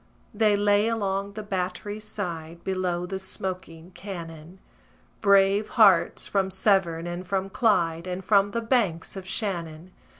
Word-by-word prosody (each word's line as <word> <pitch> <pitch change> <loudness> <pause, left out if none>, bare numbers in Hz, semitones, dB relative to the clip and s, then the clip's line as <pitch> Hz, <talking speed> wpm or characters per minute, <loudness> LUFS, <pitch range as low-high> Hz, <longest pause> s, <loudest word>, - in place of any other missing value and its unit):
They 210 -1 +3
lay 205 +1 +3
along 200 -3 -1
the 215 +1 -6
battery's 205 +2 -4
side, 170 -5 -6
Below 180 -2 -1
the 190 +1 -4
smoking 185 -3 -5
cannon: 170 -3 -9 0.6
Brave 200 0 +4
hearts, 195 -6 +5
from 195 -1 0
Severn 190 -4 +1
and 175 +1 -5
from 195 0 -2
Clyde, 175 -7 +1
And 180 +1 -5
from 200 -1 +4
the 230 +3 -2
banks 225 -10 0
of 190 -1 -8
Shannon. 175 -5 -4
190 Hz, 135 wpm, -26 LUFS, 175-205 Hz, 0.6 s, hearts